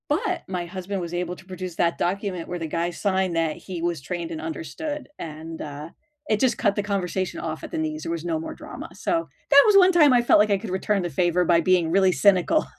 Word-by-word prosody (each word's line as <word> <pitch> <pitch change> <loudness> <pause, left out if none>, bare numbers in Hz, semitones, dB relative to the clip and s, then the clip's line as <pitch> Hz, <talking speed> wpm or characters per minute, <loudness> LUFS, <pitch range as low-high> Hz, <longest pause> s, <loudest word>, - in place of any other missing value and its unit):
But 340 +3 0
my 180 -2 -3
husband 185 +2 -5
was 170 0 -6
able 175 0 -2
to 185 - -16
produce 185 -2 -7
that 170 0 +1
document 185 -2 -2
where 180 0 -4
the 165 - -3
guy 170 +2 -1
signed 190 0 -1
that 165 -2 0
he 180 -3 -7
was 170 -3 -1
trained 170 +3 -5
and 160 -1 -5
understood, 165 - -5
and, 160 +1 -7
uh, 150 +1 -7 0.4
it 215 - +2
just 260 +1 +2
cut 205 - +1
the 205 - -1
conversation 190 -2 -2
off 160 -1 -5
at - - -7
the - - -3
knees, 155 0 -3
there - - -3
was 165 -1 -3
no 165 -2 -1
more 160 - -6
drama. - - -9
So, 335 -1 -1 0.2
that 280 0 +8
was 420 - +5
one 375 -1 +7
time 305 -6 +6
I 245 - +5
felt 240 - +5
like 210 0 +3
I 200 - +4
could 220 - -7
return 195 +2 0
the 175 - -2
favor 175 +1 +1
by 170 0 +4
being 175 -1 +3
really 190 +1 +4
cynical. 195 - +3
180 Hz, 245 wpm, -24 LUFS, 165-200 Hz, 0.4 s, that